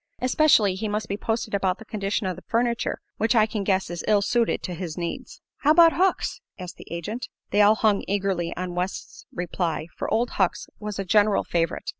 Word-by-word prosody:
Especially 255 -6 +4
he 205 +4 -3
must 210 +1 -2
be 200 - -2
posted 220 +1 -3
about 190 -2 +1
the 220 - -12
condition 205 0 -2
of 185 -1 -2
the 185 - -11
furniture, 235 0 0 0.2
which 225 +3 +1
I 215 -2 +6
can 215 -2 -3
guess 190 -1 +1
is 175 - -5
ill 205 -2 +4
suited 235 +2 +1
to 180 - -4
his 170 -2 -6
needs." 170 -1 -6
"How 300 +2 +3
'bout 335 -1 +7
Hucks?" 375 +1 0 0.2
asked 180 -2 -8
the - - -13
agent. 205 +9 -4 0.2
They 205 - +4
all 210 +1 +6
hung 215 -2 +2
eagerly 190 -4 -1
on 180 0 -4
West's 180 +2 -5
reply, 175 -2 -2
for - - -4
Old 235 +2 +1
Hucks 190 -3 0
was 210 -1 -5
a 195 - -3
general 210 +1 +3
favorite. 165 -1 -1
205 Hz, 205 wpm, -25 LUFS, 185-225 Hz, 0.2 s, bout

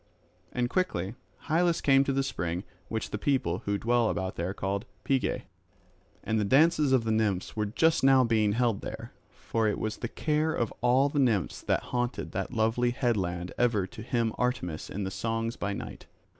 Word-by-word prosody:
And 125 -1 0
quickly 115 - -1 0.3
Hylas 170 +1 +2
came 135 -1 +5
to 140 - +1
the 135 0 +1
spring 90 -7 -3 0.2
which 110 -1 -3
the 105 - -3
people 105 - 0
who 100 0 0
dwell 115 +1 +2
thereabouts 95 0 -3
call 100 +2 -1 0.2
Pegae. 135 -2 0 0.8
And 110 0 0
the - - +1
dances 150 - +4
of 130 -3 +4
the 110 - -1
nymphs 105 -4 0
were 105 -1 0
just 160 +10 +2
now 135 -1 +6
being 110 -3 +2
held 115 -2 +1
there; - - -7 0.2
for 115 -1 -1
it 105 - 0
was 110 -1 -3
the 120 - -3
care 155 +5 0
of 115 - -1
all 125 +3 +4
the 145 0 -1
nymphs 115 -9 +1
that - - 0
haunted 120 0 -1
that - - -3
lovely 115 +1 +1
headland 95 -9 -1
ever 115 -6 +2
to - - -10
hymn 115 -2 0
Artemis 125 -11 -2
in 100 0 -3
songs 115 +2 -2
by 100 - -3
night. 100 - -7
115 Hz, 180 wpm, -29 LUFS, 100-130 Hz, 0.8 s, now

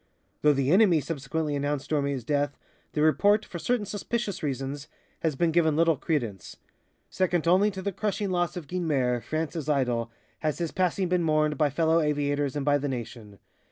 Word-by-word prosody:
Though 150 0 +5
the 135 0 +1
enemy 185 -4 +5
subsequently 150 0 -3
announced 145 0 -2
Dormé's 140 -4 0
death, 145 +2 -1 0.4
the 150 - +1
report, 205 +8 +4
for 170 - -7
certain 240 +2 0
suspicious 205 0 -3
reasons, 140 0 -3 0.3
has 160 -3 -1
been 165 +4 +1
given 160 -2 +3
little 165 0 +3
credence. 120 - -3 0.5
"Second 175 -3 0
only 190 +4 +5
to 190 -2 -7
the 200 - -1
crushing 205 0 -2
loss 175 -1 0
of 170 - -6
Guynemer, 140 -8 0
France's 155 0 -3
idol," 125 -5 +1 0.3
has 155 -2 -1
his 170 -2 -2
passing 185 0 0
been 180 0 +1
mourned 155 -2 +2
by 150 +1 +2
fellow 160 +3 +2
aviators 145 -2 0
and 145 -2 -2
by 145 0 +3
the 145 +1 -2
nation. 115 -4 -7
155 Hz, 175 wpm, -27 LUFS, 140-175 Hz, 0.5 s, Though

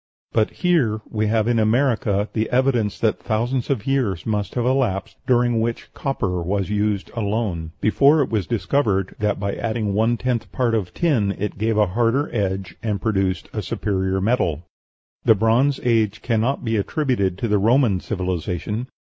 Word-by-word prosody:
But 110 -2 +2
here 140 -12 +1
we 110 -1 -1
have 110 0 +1
in 120 -1 +2
America 110 -3 +2
the 110 0 -1
evidence 125 -5 +1
that 110 -2 +1
thousands 120 +3 -1
of 125 -7 -1
years 125 -10 0
must 105 -2 -2
have 120 -1 0
elapsed 125 -7 0
during 120 -2 +3
which 115 +1 -3
copper 100 -10 -2
was 100 +3 -1
used 105 -1 -1
alone, 100 -7 -2
before 140 +7 +4
it - - -6
was 105 -5 0
discovered 100 -3 0
that 105 -1 0
by 100 0 -2
adding 110 -3 -2
one 115 +3 +2
tenth 125 -1 -2
part 120 -3 0
of 100 -6 -1
tin 115 - +1
it 105 0 -4
gave 110 0 +1
a 105 - +5
harder 115 +8 0
edge, 95 -4 -2
and 105 -4 -1
produced 95 -5 0
a - - -2
superior 95 -2 -1
metal. 95 - 0 0.6
The 110 - +5
Bronze 120 +7 +2
Age 110 -4 +1
cannot 120 +3 0
be 110 -1 +1
attributed 100 - 0
to 115 - -2
the 105 -1 +2
Roman 115 -2 +3
civilization. 95 +4 -3
110 Hz, 165 wpm, -22 LUFS, 100-120 Hz, 0.6 s, a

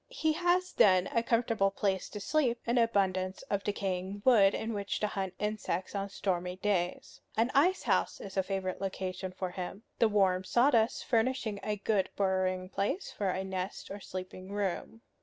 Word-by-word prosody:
He 315 -1 0
has 355 +2 +1
then 185 -2 +5
a 230 - +3
comfortable 230 -4 +2
place 195 -1 -1
to 210 - -6
sleep, 245 +1 +1
and 240 +1 +2
an - - +6
abundance 190 -4 0
of 200 -1 0
decaying 195 0 -3
wood 210 -6 +6
in 225 +1 -3
which 200 -1 -2
to - - +2
hunt 195 -3 -3
insects 210 -4 -2
on 200 0 -2
stormy 180 -2 -2
days. 185 -2 -2 0.2
An 230 +3 +2
ice 350 +8 +3
house - - +1
is 195 - -8
a 190 - +3
favorite 190 -1 -3
location 185 -1 -3
for 185 0 -4
him, 185 +3 -6 0.2
the 230 - +5
warm 190 -3 +3
sawdust 235 +1 +3
furnishing 230 -3 0
a 210 - -1
good 205 -1 0
burrowing 185 -1 0
place 200 - -2
for 200 -2 -1
a 185 +1 -1
nest 190 +1 -5
or 200 - -5
sleeping 185 0 -7
room. 205 +2 -3
200 Hz, 175 wpm, -31 LUFS, 185-225 Hz, 0.2 s, an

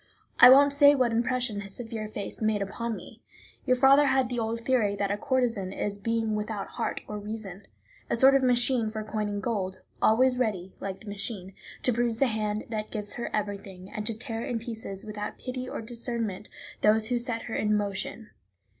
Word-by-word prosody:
I 250 - +11
won't 280 +2 +7
say 285 0 +7
what 250 -3 +2
impression 240 -2 0
his 195 -1 -7
severe 225 -3 -5
face 210 0 -5
made 215 -2 +1
upon 230 +3 -4
me. - - -11 0.4
Your 255 - +4
father 275 +2 +6
had 265 -2 +2
the 245 -1 -2
old 230 +1 -2
theory 230 -5 +1
that 200 0 -1
a - - +1
courtesan 245 -9 0
is 200 +1 -3
a - - -21
being 225 0 0
without 210 -1 -3
heart - - -3
or 210 0 -5
reason, 205 -2 -7 0.4
a - - +1
sort 265 +3 +6
of 275 - +4
machine 245 -2 +2
for 215 0 -5
coining 210 -1 -3
gold, 190 -4 -3 0.2
always 250 +3 +4
ready, 190 -6 -1
like 195 -1 -5
the 220 - -13
machine, 200 -2 -4 0.3
to 250 - +2
bruise 235 -1 +1
the 275 - +4
hand 215 -3 -1
that 215 -2 -3
gives 210 -2 -4
her 240 - -4
everything, 200 -3 -4
and 210 0 -4
to 225 -2 -1
tear 225 -1 -4
in 245 - -2
pieces, 225 -3 -6
without 210 -1 -5
pity 255 0 -5
or - - -5
discernment, 230 -3 -3 0.3
those 220 +1 +4
who 245 -1 +1
set 235 -2 -2
her 225 - -6
in 210 0 +2
motion. 205 +2 -3
220 Hz, 200 wpm, -28 LUFS, 205-245 Hz, 0.4 s, I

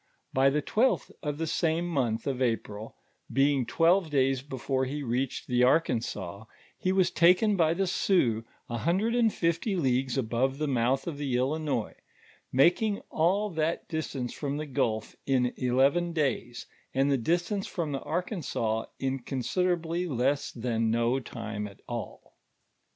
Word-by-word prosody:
IJy 135 +1 +5
the 150 - +1
twelfth 255 +4 +1
of 150 -3 -3
the 165 - -1
same 165 +1 0
month 120 -9 -1
of 130 -2 -2
April, 110 -3 -2 0.4
being 135 -2 +2
twelve 170 +1 +3
days 135 -2 +2
before 130 -1 -2
he 145 +3 -4
reached 125 +1 -2
the 125 0 +1
Arkansas, 110 - 0 0.3
he 185 - -1
was 190 -1 +3
taken 185 +5 +4
by 165 -2 +3
the 195 +2 +1
Sioux 130 - +2 0.2
a 120 -1 -3
hundred 190 - +1
and 235 -2 +3
fifty 170 +4 0
leagues 130 -5 +1
above 130 +2 0
the 155 - -1
mouth 130 0 +1
of 155 -4 -5
the 135 -4 0
Illinois, 135 -3 -1 0.6
making 180 - +3
nil 195 +6 +2
that 160 0 -1
dis 160 -1 -3
tance 125 -3 -3
from 145 -1 -3
the 155 - -3
gulf 110 -5 -1
in 125 -2 +2
eleven 135 +7 +2
days, 130 -6 -1 0.3
and 135 +2 +3
the - - +4
distance 175 - 0
from 165 -4 -3
the 135 - -3
Arkansas, 145 - -2
in 135 0 -1
con 130 +1 -4
siderably 175 +2 0
less 135 +2 0
than 115 -2 -1
no 120 +3 +2
time 110 -4 -5
nt 100 - -17
all. - - -7
140 Hz, 155 wpm, -28 LUFS, 125-170 Hz, 0.6 s, IJy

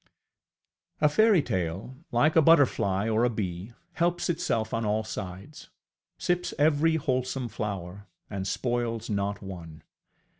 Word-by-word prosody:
A 150 - +5
fairytale, 130 - +1 0.2
like 135 +7 +3
a 160 - +7
butterfly 125 - +4
or 110 +1 +2
a 125 - +4
bee, 100 -1 -4 0.2
helps 175 0 +1
itself 115 -10 -1
on 115 0 0
all 110 +1 0
sides, 100 +6 -8 0.5
sips 180 0 -1
at - - -13
every 155 +2 +3
wholesome 130 -3 -1
flower, 100 -2 -5 0.2
and 95 -2 -4
spoils 120 -1 -2
not 100 0 -2
one. 85 -5 -9
115 Hz, 125 wpm, -27 LUFS, 100-150 Hz, 0.5 s, a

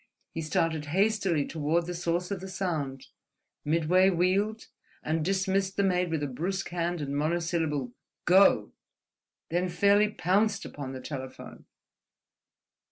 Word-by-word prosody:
He 165 - -3
started 160 0 0
hastily 190 -2 +1
toward 160 +2 0
the 180 - -4
source 175 +1 -2
of 200 - -2
the 190 - -6
sound, 155 -9 -3 0.6
midway 170 +5 +3
wheeled, 195 +5 +1 0.4
and 155 +1 -1
dismissed 190 +1 0
the 200 - +3
maid 180 -2 +1
with 160 -2 -1
a - - 0
brusque 180 +9 -3
hand 175 -1 -2
and 140 -1 -3
monosyllable—"Go!"—then 165 +3 0
fairly 200 +4 +4
pounced 200 +2 +1
upon 135 -2 -7
the 130 - -7
telephone. 130 -2 -8
175 Hz, 120 wpm, -28 LUFS, 155-190 Hz, 0.6 s, fairly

